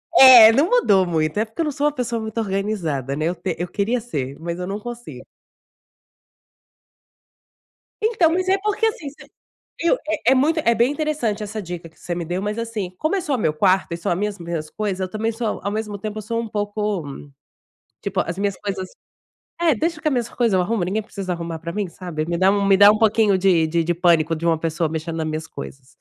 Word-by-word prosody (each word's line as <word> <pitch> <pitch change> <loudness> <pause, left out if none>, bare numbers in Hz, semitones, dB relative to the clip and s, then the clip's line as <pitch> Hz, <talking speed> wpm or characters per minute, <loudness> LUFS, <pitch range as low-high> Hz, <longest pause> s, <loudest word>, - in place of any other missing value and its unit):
É, 250 -6 +10
não 280 +9 +2
mudou 205 - +4
muito. 160 +1 -1
É 220 - +2
porque 225 +9 -6
eu - - +1
não 300 - -1
sou 285 +1 -2
uma - - +1
pessoa 235 -3 -2
muito 220 +1 -4
organizada, 190 - -2
né? 155 +2 -2
Eu 175 - -1
te - - -3
eu 175 - -2
queria 210 +7 -1
ser, 140 - -5
mas 170 +1 -5
eu 180 - -4
não 200 +2 -4
consigo. 240 +2 -8 2.8
Então, 430 -7 +3
mas 370 +2 0
é 385 +1 +3
porque 425 +1 0
assim, 390 -10 -2
você 285 - -16 0.5
viu, 340 +8 +3
é - - +1
é - - +6
muito, 300 +5 +2
é 235 -5 +2
bem 235 +3 +3
interessante 290 -9 -2
essa 215 +1 -5
dica 175 -3 -7
que 160 - -26
você 175 - -4
me 170 -1 -4
deu, 175 +3 -3
mas 210 +2 -3
assim, 220 -6 -4
como 315 +6 0
é - - 0
só 300 -5 -2
o - - -1
meu 160 -8 +1
quarto 185 +3 +2
e - - -1
só 170 0 -1
mesmo 200 -1 -3
as 170 - -10
minhas 155 -2 -4
coisas, 200 -3 -3
eu 185 - -2
também 220 +3 -1
sou 225 -1 -3
ao 200 - -2
mesmo 210 -1 -4
tempo 215 +1 -5
eu - - -5
sou 230 +3 -2
um 230 - -5
pouco, 205 -3 -2 1.0
tipo, - - -2
as 170 +2 -5
minhas 200 -1 -1
coisas 190 -2 -4 0.7
é, 330 -5 +4
"Deixa 325 +6 -2
que 310 - 0
a - - 0
minhas 245 -4 -1
coisa 230 -6 +1
eu - - +3
arrumo, 205 +3 -1
ninguém 200 +5 -1
precisa 195 -3 -5
arrumar 170 -1 -5
pra 170 +1 -6
mim.", 205 -1 -2
sabe? 170 -3 -5
Me 170 0 -1
dá 190 +2 +4
um, 200 0 +1
me 195 -1 +5
dá 205 +1 +8
um 215 - +2
pouquinho 220 -3 +3
de 180 -4 +3
de 165 +1 0
de 175 +1 0
pânico 165 -2 +2
de 165 - -7
uma 165 -1 +2
pessoa 165 0 -1
mexendo 160 +1 -4
nas 160 -1 -2
minhas 155 0 -4
coisas. 135 -2 -10
205 Hz, 235 wpm, -21 LUFS, 170-230 Hz, 2.8 s, É